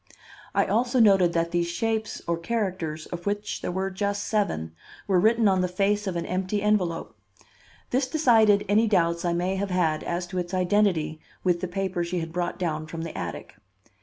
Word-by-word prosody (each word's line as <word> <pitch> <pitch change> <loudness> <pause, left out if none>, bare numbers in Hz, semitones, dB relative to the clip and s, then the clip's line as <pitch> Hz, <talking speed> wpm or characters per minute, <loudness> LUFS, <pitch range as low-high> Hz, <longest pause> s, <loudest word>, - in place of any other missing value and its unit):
I - - +4
also 245 +2 +1
noted 195 -6 +5
that 170 0 0
these 170 0 +1
shapes 220 +5 -2
or 170 - 0
characters, 170 -5 -3
of 175 +1 -7
which 205 +1 -2
there - - -3
were 190 +1 -2
just 200 +1 -2
seven, 80 - -1 0.3
were 190 -3 +3
written 220 +3 +4
on 190 -1 +3
the 180 - +1
face 200 +3 0
of 185 - -2
an 170 0 -2
empty 185 +3 -1
envelope. 190 -6 0 0.8
This 255 +1 +1
decided 225 -9 +4
any 215 +3 +3
doubts 170 -4 +2
I 170 - +1
may 180 +3 -1
have 200 +1 -2
had 165 -4 +1
as 175 +1 -2
to 185 - 0
its 175 +1 -3
identity 180 -5 +1 0.2
with 175 -2 +1
the 185 - -2
paper 185 -1 -2
she 175 +1 -3
had 165 0 -5
brought 175 0 -2
down 155 -3 -2
from 165 +1 -6
the 165 - -6
attic. - - -6
185 Hz, 195 wpm, -26 LUFS, 170-205 Hz, 0.8 s, noted